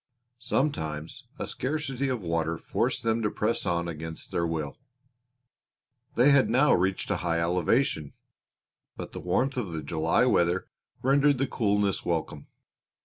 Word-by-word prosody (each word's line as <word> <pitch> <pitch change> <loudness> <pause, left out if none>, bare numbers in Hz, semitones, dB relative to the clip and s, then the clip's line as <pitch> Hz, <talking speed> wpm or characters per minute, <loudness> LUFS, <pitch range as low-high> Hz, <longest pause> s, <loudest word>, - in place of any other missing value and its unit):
Sometimes 80 - -2
a - - -3
scarcity 135 -1 -2
of 125 -4 -2
water 85 -1 -1
forced - - -1
them 115 0 +1
to 105 - +1
press 105 0 -1
on 85 -1 0
against 80 0 -6
their 85 0 0
will. 80 -3 -4 1.4
They 125 +5 +6
had 140 -2 +5
now 135 +5 +4
reached 95 +1 0
a - - +1
high 85 -1 0
elevation, 85 - +1 0.8
but - - -6
the - - -7
warmth 135 +1 0
of 100 -9 -3
the 80 -1 -4
July 80 - +2
weather 90 -6 +2 0.4
rendered 140 +1 +4
the 135 - +1
coolness 105 -5 0
welcome. 80 -4 -3
95 Hz, 145 wpm, -27 LUFS, 80-130 Hz, 1.4 s, They